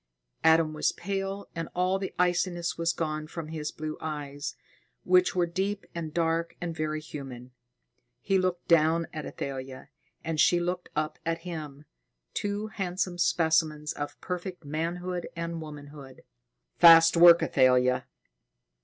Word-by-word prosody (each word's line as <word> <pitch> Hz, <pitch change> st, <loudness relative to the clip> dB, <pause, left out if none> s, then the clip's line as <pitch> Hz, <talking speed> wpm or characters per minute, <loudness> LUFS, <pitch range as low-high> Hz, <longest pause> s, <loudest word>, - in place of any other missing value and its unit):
Adam 160 Hz, -1 st, +4 dB
was 155 Hz, -, +1 dB
pale, 195 Hz, +1 st, -4 dB
and 165 Hz, -1 st, -5 dB
all 185 Hz, +2 st, +1 dB
the 190 Hz, -, -4 dB
iciness 175 Hz, -1 st, 0 dB
was 165 Hz, 0 st, +1 dB
gone 155 Hz, -2 st, -3 dB
from 160 Hz, -1 st, -7 dB
his 155 Hz, -2 st, -4 dB
blue 155 Hz, 0 st, -6 dB
eyes, 145 Hz, -2 st, -5 dB, 0.5 s
which 180 Hz, 0 st, +3 dB
were 175 Hz, -1 st, +3 dB
deep 195 Hz, +4 st, -3 dB
and 165 Hz, -2 st, -5 dB
dark 165 Hz, 0 st, 0 dB
and 170 Hz, -2 st, -4 dB
very 155 Hz, 0 st, -2 dB
human. 135 Hz, -5 st, -9 dB, 0.7 s
He 195 Hz, +7 st, +1 dB
looked 185 Hz, -1 st, -2 dB
down 165 Hz, 0 st, +4 dB
at 155 Hz, -2 st, -5 dB
Athalia, 130 Hz, -1 st, -6 dB, 0.3 s
and 160 Hz, -1 st, -3 dB
she 175 Hz, +3 st, +5 dB
looked 175 Hz, +1 st, -3 dB
up 155 Hz, 0 st, -2 dB
at 165 Hz, 0 st, -2 dB
him, 150 Hz, -4 st, -7 dB, 0.5 s
two 205 Hz, +1 st, -2 dB
handsome 185 Hz, -4 st, -3 dB
specimens 160 Hz, -3 st, +1 dB
of 145 Hz, 0 st, -6 dB
perfect 180 Hz, -2 st, -5 dB
manhood 175 Hz, +4 st, -3 dB
and 170 Hz, 0 st, -4 dB
womanhood. 145 Hz, -3 st, -11 dB, 0.6 s
"Fast 165 Hz, 0 st, +8 dB
work, 170 Hz, 0 st, +8 dB
Athalia!" 125 Hz, -1 st, +3 dB
165 Hz, 135 wpm, -28 LUFS, 155-175 Hz, 0.7 s, Fast